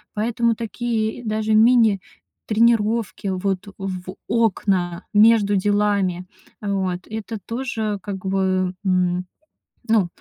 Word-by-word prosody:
поэтому 230 +2 +1
такие 230 0 -2
и - - -10
даже 215 -1 -1
мини-тренировки, 220 -1 +2
вот, 190 +1 -2
в 185 -1 -5
окна 190 -6 0
между 210 -1 +5
делами, 200 -2 +1 0.4
вот 190 -3 -2
это 220 0 -5
тоже, 225 -4 -3
как 195 -2 -6
бы, 190 -1 0
м, 180 -1 +1 0.6
ну, 215 -5 +4
205 Hz, 100 wpm, -22 LUFS, 185-225 Hz, 0.6 s, между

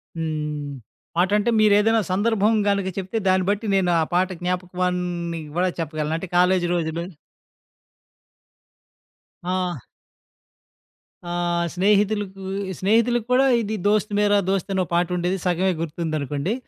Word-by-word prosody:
హ్మ్. 150 -2 -3 0.5
పాటంటే 205 +5 +2
మీరేదైనా 215 +2 +4
సందర్భం 210 +2 +2 0.2
గనుక 200 -1 0
చెప్తే 190 +3 -3
దాన్ని 185 0 +3
బట్టి 205 +2 -1
నేను 185 -2 +2
ఆ - - +3
పాట 180 +1 +3
జ్ఞాపకాన్ని 180 -1 -2 0.2
కూడా 185 +1 +2
చెప్పగలను. 155 -1 -2
అంటే 180 +3 -6
కాలేజీ 180 0 +3
రోజులు. 165 0 -2 2.4
ఆ! 180 -2 -1 1.5
ఆ! - - -6 0.5
స్నేహితులకు, 200 0 +1 0.4
స్నేహితులకు 230 +4 +2
కూడా 265 +2 +5 0.2
ఇది 220 0 -3
'దోస్త్ 210 0 +2
మేర, 205 0 +3 0.2
దోస్త్' 195 0 -1
అనో 190 -1 +1
పాటుండేది 180 +1 0
సగమే 180 +1 +1
గుర్తుందనుకోండి. 155 - -2
185 Hz, 110 wpm, -23 LUFS, 170-205 Hz, 2.4 s, కూడా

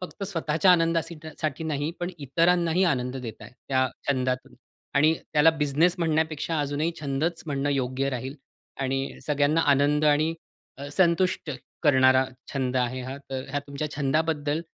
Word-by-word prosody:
फक्त 185 +2 -8
स्वतःच्या 165 -1 +2
आनंदासीठा 165 -1 0
साठी 155 +1 -2
नाही, 150 0 -1
पण 175 +1 -2
इतरांनाही 170 +5 +2
आनंद 125 -5 0
देताय 115 -3 -8 0.2
त्या 130 -1 +2 0.2
छंदातून. 130 -2 -1 0.4
आणि 155 +3 +5 0.2
त्याला 150 +1 +6
बिझनेस 160 +3 +2
म्हणण्यापेक्षा 160 -1 0
अजूनही 145 +3 -1
छंदच 155 +4 -1
म्हणणं 145 0 -1
योग्य 135 0 0
राहील. 130 +2 -4 0.5
आणि 135 0 -2
सगळ्यांना 150 +2 +2
आनंद 145 +2 +2
आणि 155 +2 +3 0.4
अ, 140 - -6
संतुष्ट 180 -1 +2 0.3
करणारा 130 -3 +5 0.3
छंद 130 -2 -1
आहे 125 0 0
हा. 130 +2 -6
तर 135 -1 -6
ह्या 145 +1 -1
तुमच्या 140 +2 -4
छंदाबद्दल 150 +1 0
145 Hz, 140 wpm, -26 LUFS, 135-160 Hz, 0.5 s, त्याला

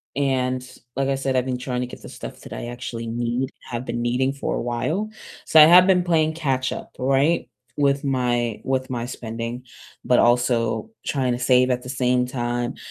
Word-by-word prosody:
and 130 -2 0 0.3
like 135 0 0
I 135 - +2
said, 135 0 -1
I've 130 0 +2
been 130 -1 -2
trying 125 0 -3
to 125 - -2
get - - -11
the - - -10
stuff - - -9
that - - -10
I 120 - -5
actually 120 -1 -6
need, 120 +3 -1
have 120 0 -5
been 120 -1 -3
needing 125 +3 +1
for 140 - -3
a - - -2
while, 125 - -2 0.4
so 160 - +6
I - - +12
have 180 +3 +8
been 180 -2 +4
playing 160 -2 +2
catch-up, 135 -5 -2
right, 135 +6 +2 0.3
with 140 0 +2
my 120 -4 0
with 130 0 -1
my 120 -1 -3
spending, 115 +1 -5 0.4
but - - +4
also 120 - +2 0.2
trying 130 -3 0
to 120 - -3
save 125 0 +4
at 125 0 0
the 125 - -9
same 125 -1 +1
time. 120 -1 -2
125 Hz, 195 wpm, -23 LUFS, 120-135 Hz, 0.4 s, I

